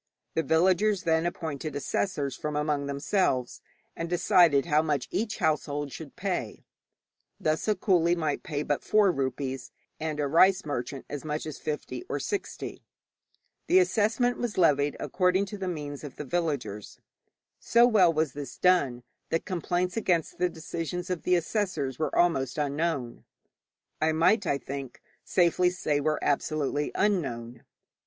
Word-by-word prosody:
The 160 - +1
villagers 185 +5 +2
then 160 0 +2
appointed 155 -4 -4
assessors 145 -2 -1
from 150 -1 -4
among 150 -1 0
themselves, 140 -3 0 0.3
and 165 0 -4
decided 170 -4 +4
how 155 -2 +3
much 150 -5 -1
each 215 0 -1
household 145 -2 -1
should 155 0 -9
pay. 180 - -3 0.7
Thus 155 +5 0
a 215 - +3
coolie 175 -3 +2
might 155 -3 -1
pay 145 -1 -3
but 145 -1 -1
four 210 -3 +4
rupees, 135 -2 -3 0.3
and 155 -1 -3
a 145 - +1
rice 185 +6 +4
merchant 135 -1 -4
as 145 - -6
much 150 0 -3
as 155 -2 -6
fifty 150 - -4
or - - -1
sixty. 405 -2 -4 0.9
The 360 - +5
assessment 245 - +2
was 240 -4 -3
levied 145 -5 +3
according 185 +2 +1
to 205 +1 -7
the 190 - -3
means 150 -5 -5
of 145 - -8
the 150 - -6
villagers. 135 - -3 0.6
So 235 +1 +5
well 205 -8 +5
was 155 -4 0
this 145 -1 -7
done, 140 -10 +2 0.3
that 165 - -1
complaints 180 +1 -1
against 175 -8 0
the 180 0 +2
decisions 170 +2 -5
of 180 - -2
the 180 - +2
assessors 165 - -1
were 155 - -1
almost 135 -7 +2
unknown 145 -4 -2 0.8
I 160 0 +3
might, 175 +5 +3
I 140 - +2
think, 135 -2 -7 0.2
safely 180 0 +3
say 155 -5 -1
were 155 +1 +1
absolutely 145 0 0
unknown. 125 - -1
160 Hz, 150 wpm, -28 LUFS, 145-180 Hz, 0.9 s, The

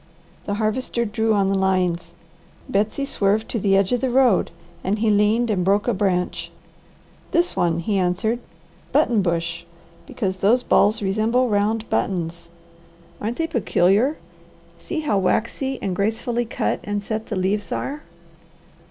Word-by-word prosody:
The 205 - -2
Harvester 235 +2 -1
drew 220 0 +1
on 200 -1 +2
the 195 - +1
lines, 185 -3 0 0.5
Betsy 215 +7 0
swerved 210 -3 +1
to 230 - -2
the 195 -1 +3
edge 195 -1 +2
of 245 -1 +1
the 260 - +1
road, 245 -5 +3 0.3
and 195 +3 0
he 215 0 +2
leaned 215 +3 +3
and 185 -3 0
broke 200 +4 +2
a 240 - +2
branch. 185 -3 -1 0.8
"This 350 +1 +1
one," 170 -2 +1
he 195 +4 0
answered. 190 +6 0 0.5
"Buttonbush, 170 -8 +1 0.4
because 190 -5 -3
those 225 +7 +3
balls 210 -2 +3
resemble 225 +6 +1
round 215 +2 0
buttons. 170 -2 -2 0.7
Aren't 225 +3 -3
they 330 - 0
peculiar? 235 - +2 0.6
See 325 - -4
how 215 -10 +1
waxy 255 +7 0
and 190 -2 -1
gracefully 230 +4 -1
cut 225 - -1
and 205 0 -3
set 220 +1 -4
the 215 - -3
leaves 190 +1 -1
are. 290 +2 -3
210 Hz, 145 wpm, -22 LUFS, 190-235 Hz, 0.8 s, the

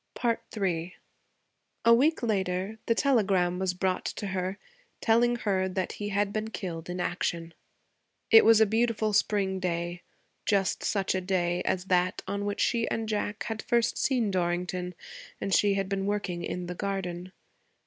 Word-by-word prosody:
III 180 -4 -1 0.9
A 230 - +8
week 285 +5 +3
later 195 -1 -1
the 230 - +3
telegram 195 -10 +2
was 190 -1 0
brought 185 0 0
to 205 - -4
her 190 0 -2 0.4
telling 240 +1 +3
her 190 -5 0
that 185 0 -2
he 205 0 -5
had 200 0 0
been 215 0 -2
killed 170 -6 -6
in 180 +1 -4
action. 170 -1 -2 0.8
It 225 - +9
was 225 -1 +6
a 220 - +6
beautiful 220 0 +1
spring 195 -2 +1
day, 175 -1 -2 0.4
just 195 -2 +1
such 195 -2 0
a 185 - -1
day 180 -2 0
as 185 0 0
that 180 -1 +1
on 200 +1 -2
which 205 0 -2
she 230 -1 +1
and 225 -1 -2
Jack 210 -1 -2
had 220 0 -4
first 235 -1 +1
seen 245 -6 +1
Dorrington, 180 0 -1 0.4
and 195 - -2
she 200 +1 +4
had 195 -1 -1
been 195 0 -2
working 200 -4 -2
in 180 0 -4
the 180 - -4
garden. 185 -2 -4
195 Hz, 160 wpm, -28 LUFS, 180-215 Hz, 0.9 s, It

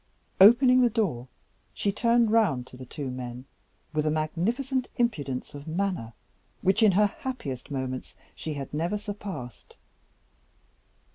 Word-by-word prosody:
Opening 250 +5 +8
the 245 - +5
door, 175 - -1 0.5
she 200 - 0
turned 235 +1 +3
round 185 - +3
to 130 - -14
the 130 0 -10
two 140 -1 -5
men, 125 0 -6 0.5
with 150 0 +1
a - - +4
magnificent 230 - -1
impudence 150 - -1
of 145 +1 -9
manner 170 - -2 0.5
which 190 +4 +3
in 215 -3 +6
her 210 +3 +5
happiest 200 - -5
moments 130 -2 -4 0.2
she 155 -2 -5
had 140 -1 -6
never 170 +7 -1
surpassed. 200 - -7
175 Hz, 135 wpm, -27 LUFS, 135-220 Hz, 0.5 s, Opening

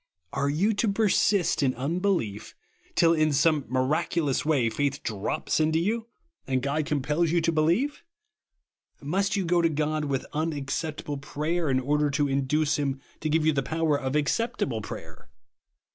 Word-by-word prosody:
Are 140 - 0
you 185 +10 +2
to 210 +2 0
persist 200 -4 +2
in 130 -2 +1
unbelief 140 - -1 0.4
till 165 -1 +5
in 155 -1 +2
some 145 0 +2
miraculous 135 +3 0
way 145 -6 +2
faith 140 +4 -1
drops 105 +6 -2
into 155 +1 +2
you, 220 +7 -1 0.4
and 130 -1 0
God 145 +2 -1
compels 150 +3 0
you 170 +2 +2
to 165 0 +1
be 155 -1 +1
lieve? 240 - +1 1.0
Must 195 +9 0
you 195 -2 0
go 175 0 +3
to 165 - +3
God 155 0 -1
with 135 -2 -2
unac 150 -3 -2
ceptahle 150 -3 -3
prayer, 155 +3 -2
in 130 -1 +2
order 145 +3 +1
to 145 +1 +1
induce 140 +2 +1
him 140 -2 -1 0.2
to 155 - -2
give 155 0 +2
you 155 - +4
the 140 - +1
power 160 +2 0
of 135 0 -2
acceptable 150 - 0
prayer - - -9
150 Hz, 165 wpm, -27 LUFS, 140-165 Hz, 1.0 s, till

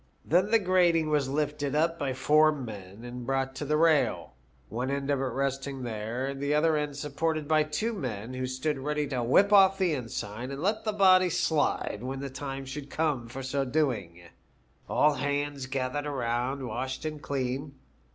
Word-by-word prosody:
Then 185 +5 +3
the 225 - +6
grating 175 -5 +3
was 145 -3 +1
lifted 145 -1 -1 0.3
by 140 -3 -1
four 150 +4 +4
men 110 -7 -8
and 120 0 -7
brought 135 +1 -1
to 145 - -5
the 150 +2 +1
rail, 160 - +2 0.3
one 125 +4 -3
end 140 0 -1
of 140 - +1
it 135 - 0
resting 135 0 -2
there, 120 +4 -3
the 140 +2 -1
other 160 +1 +3
end 150 -2 -2
supported 155 +1 -2
by 155 0 +4
.two 155 +10 -1
men, 125 - -5
who 130 0 -3
stood 135 +3 -2
ready 150 +2 -1
to 130 -3 -1
whip 195 - +4
off 195 -1 +7
the 185 -4 +2
ensign 115 -2 -4
and 140 0 -5
let 215 +6 0
the 215 - +1
body 185 -3 +5
slide 155 -9 0
when 130 +2 -4
the 140 -1 -5
time 135 0 -5
should 140 +1 -7
come 145 -7 -1
for 130 +3 -7
so 135 +1 -1
doing. 125 - -1 0.7
All 150 0 +4
hands 145 0 -2
gathered 135 +2 -2
around, 130 0 -2
washed 130 +5 -4
and 155 -1 -4
clean. 135 +1 -3
140 Hz, 180 wpm, -28 LUFS, 130-155 Hz, 0.7 s, off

